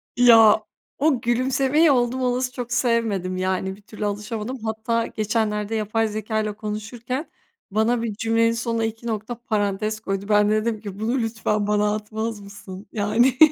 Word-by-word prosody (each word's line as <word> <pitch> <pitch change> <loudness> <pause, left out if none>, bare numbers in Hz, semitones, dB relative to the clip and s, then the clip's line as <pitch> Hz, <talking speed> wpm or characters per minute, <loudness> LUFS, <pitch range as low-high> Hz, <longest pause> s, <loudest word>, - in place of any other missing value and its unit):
Ya, 225 -3 +7 0.3
o 275 -4 +2
gülümsemeyi 265 +5 +3
oldum 250 0 +1
olası 250 0 0
çok 245 -1 -5
sevmedim. 225 -7 0
Yani 190 +1 -1
bir 205 - -19
türlü 210 0 -6
alışamadım. 210 +4 -3
Hatta 225 +1 -1
geçenlerde 215 0 -1
yapay 220 +1 0
zekâyla 215 0 -2
konuşurken 225 +7 -5 0.4
bana 225 +3 +2
bir 220 -3 -2
cümlenin 230 +1 +2
sonuna 230 -1 -1
iki 225 +1 -5
nokta 220 +2 -3
parantez 215 -2 -1
koydu. 195 -2 -3
Ben 210 0 +4
de - - +2
dedim 225 -1 -2
ki, 205 -1 -8
"Bunu 235 +4 0
lütfen 215 -2 -1
bana 210 0 +2
atmaz 215 +1 -4
mısın?" 200 -1 -10
Yani. 230 +5 +2
220 Hz, 150 wpm, -23 LUFS, 210-235 Hz, 0.4 s, Ya